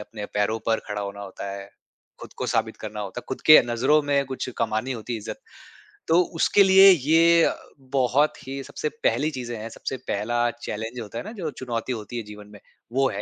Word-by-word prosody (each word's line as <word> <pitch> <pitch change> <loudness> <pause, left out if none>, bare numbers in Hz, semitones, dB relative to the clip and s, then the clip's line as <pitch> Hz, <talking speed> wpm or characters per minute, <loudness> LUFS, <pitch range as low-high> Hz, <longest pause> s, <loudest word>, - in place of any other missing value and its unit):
अपने 105 0 -8
पैरों 105 +2 +1
पर 115 -1 +2
खड़ा 105 -1 -4
होना 100 0 -6
होता 100 0 -7
है, 100 0 -7 0.5
ख़ुद - - -10
को - - -2
साबित - - -1
करना 105 0 -7
होता 100 +4 -5
है, - - -26
ख़ुद 130 - -4
के 155 - +10
नज़रों 125 +6 +3
में 140 -1 +1
कुछ 130 0 -5
कमानी 110 +4 -1
होती 120 0 -6
है 115 - -2
इज़्ज़त। 105 - -7 0.7
तो 165 +2 +5 0.2
उसके 200 - +5
लिए 195 0 +8
ये 165 +1 +4
अ, - - +2 0.2
बहुत 135 +2 +1
ही 135 +1 -5
सबसे 150 - -4
पहली 135 +7 +2
चीज़ें 120 -3 -5
हैं 110 +1 -6
सबसे 130 - -5
पहला 120 +4 0
चैलेंज 110 +2 -5
होता 110 +1 -8
है 120 - -4
ना - - -8
जो 160 - -2
चुनौती 125 -2 -4
होती 110 +1 -6
है 115 - -3
जीवन 105 0 -11
में। 100 - -12 0.3
वो 135 0 +2
है 100 - -4
120 Hz, 215 wpm, -24 LUFS, 105-140 Hz, 0.7 s, के